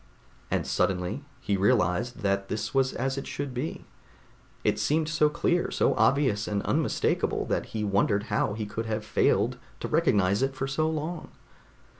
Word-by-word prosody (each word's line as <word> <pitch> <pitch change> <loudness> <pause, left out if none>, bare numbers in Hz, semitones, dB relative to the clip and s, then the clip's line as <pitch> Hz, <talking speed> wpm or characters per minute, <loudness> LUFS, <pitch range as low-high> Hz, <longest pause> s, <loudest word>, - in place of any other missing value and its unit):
And - - 0
suddenly 90 +9 0 0.2
he 100 - 0
realized 105 +2 +1
that 100 -1 0
this 105 +6 -3
was 135 -1 +2
as 135 +2 -1
it - - -7
should 140 -2 -4
be. 130 +6 -4 0.8
It - - +1
seemed 155 +1 +1
so 155 -1 +3
clear, 175 +3 +1
so - - +2
obvious 110 -2 +2
and 100 -1 -1
unmistakable - - 0
that - - -1
he 110 -1 -3
wondered 100 0 +2
how 105 - +1
he 110 -1 -3
could 110 +2 -4
have 110 -1 -2
failed - - +2 0.2
to - - -3
recognize 100 +1 +2
it 135 0 0
for 135 - -2
so 155 +4 0
long. 160 +1 -4
115 Hz, 165 wpm, -27 LUFS, 100-140 Hz, 0.8 s, so